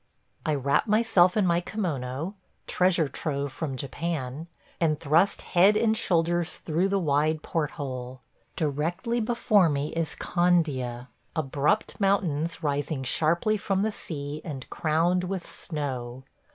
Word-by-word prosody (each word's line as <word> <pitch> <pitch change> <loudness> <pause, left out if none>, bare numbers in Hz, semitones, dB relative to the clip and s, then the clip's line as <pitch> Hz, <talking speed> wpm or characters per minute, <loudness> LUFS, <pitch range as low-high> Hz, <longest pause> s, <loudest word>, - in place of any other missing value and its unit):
I 155 - +2
wrap 140 - +1
myself 210 -4 +4
in 205 - +3
my 170 -1 +3
kimono 160 - -3 0.2
– - - -44
treasure 180 -4 +2
trove 140 0 -3
from 135 -1 -4
Japan 145 +1 -4 0.2
– - - -32
and 155 -3 +2
thrust 165 +7 +2
head 195 +4 +4
and 220 0 +3
shoulders 175 -3 +1
through 175 +4 0
the 200 - +2
wide 155 -2 +1
port 155 -3 -1
hole. 130 -3 -5 0.3
Directly 165 - -1
before 215 -5 +3
me 145 0 -1
is 165 -2 -2
Candia 145 -9 0
– - - -40
abrupt 150 +8 0
mountains 170 -5 +1
rising 145 -1 -1
sharply 170 +10 +2
from 195 -1 0
the 220 - +1
sea 150 -6 -6
and 140 -6 -6
crowned 170 +3 +1
with 185 -1 -4
snow. 130 -5 -5
160 Hz, 140 wpm, -27 LUFS, 140-180 Hz, 0.3 s, myself